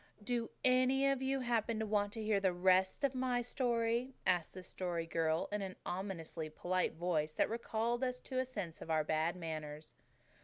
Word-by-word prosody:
"Do 235 Hz, +1 st, -1 dB, 0.2 s
any 255 Hz, +2 st, +4 dB
of 275 Hz, -1 st, +2 dB
you 265 Hz, 0 st, 0 dB
happen 230 Hz, -2 st, +1 dB
to 220 Hz, -, -1 dB
want 205 Hz, -1 st, +1 dB
to 225 Hz, -, -4 dB
hear 210 Hz, -2 st, +2 dB
the 190 Hz, -2 st, +2 dB
rest 185 Hz, +5 st, +3 dB
of 275 Hz, -2 st, +3 dB
my 255 Hz, -1 st, 0 dB
story?" 240 Hz, 0 st, 0 dB
asked 180 Hz, -2 st, +1 dB
the 185 Hz, -, -7 dB
Story 175 Hz, -3 st, -3 dB
Girl 165 Hz, 0 st, +1 dB
in 210 Hz, 0 st, -1 dB
an 190 Hz, -1 st, -4 dB
ominously 175 Hz, -4 st, -4 dB
polite 180 Hz, +4 st, 0 dB
voice 160 Hz, -2 st, 0 dB
that -, -, +2 dB
recalled 235 Hz, +1 st, -1 dB
us 250 Hz, -1 st, -1 dB
to 260 Hz, -1 st, -3 dB
a 260 Hz, -, +1 dB
sense 200 Hz, -10 st, -5 dB
of -, -, -8 dB
our 155 Hz, -1 st, +3 dB
bad 160 Hz, +3 st, +1 dB
manners. 155 Hz, -3 st, -5 dB
205 Hz, 190 wpm, -36 LUFS, 170-245 Hz, 0.2 s, any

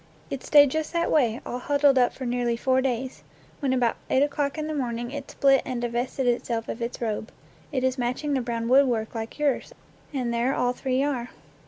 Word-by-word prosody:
It 275 Hz, -, -3 dB
stayed 290 Hz, -3 st, +6 dB
just 315 Hz, +2 st, -2 dB
that 340 Hz, 0 st, +1 dB
way, 245 Hz, -6 st, +2 dB
all 245 Hz, -, -4 dB
huddled 285 Hz, 0 st, +3 dB
up 245 Hz, -, +4 dB
for 260 Hz, -, -7 dB
nearly 240 Hz, -1 st, 0 dB
four 260 Hz, +2 st, +2 dB
days, 255 Hz, 0 st, -2 dB, 0.4 s
when 275 Hz, -4 st, 0 dB
about 250 Hz, -3 st, +1 dB
eight 265 Hz, -, +4 dB
o'clock 285 Hz, 0 st, -1 dB
in 310 Hz, -, -2 dB
the 310 Hz, -, -3 dB
morn 245 Hz, -5 st, -2 dB
ing 240 Hz, +1 st, -5 dB
it 285 Hz, -1 st, -6 dB
split 270 Hz, -1 st, +4 dB
and 255 Hz, -2 st, -3 dB
divested 240 Hz, +2 st, -2 dB
itself 235 Hz, -1 st, 0 dB
of 235 Hz, -, -5 dB
its 235 Hz, +1 st, -3 dB
robe. 220 Hz, -1 st, -3 dB, 0.4 s
It 260 Hz, -3 st, -1 dB
is 260 Hz, 0 st, 0 dB
matching 250 Hz, +5 st, -1 dB
the 265 Hz, -, +1 dB
brown 230 Hz, -1 st, -3 dB
woodwork 245 Hz, -4 st, +3 dB
like 225 Hz, -1 st, -5 dB
yours, 295 Hz, -, 0 dB, 0.4 s
and 250 Hz, -5 st, -2 dB
there 240 Hz, +3 st, +1 dB
all 245 Hz, 0 st, +1 dB
three 260 Hz, +1 st, 0 dB
are! 255 Hz, -4 st, -2 dB
255 Hz, 210 wpm, -26 LUFS, 240-280 Hz, 0.4 s, stayed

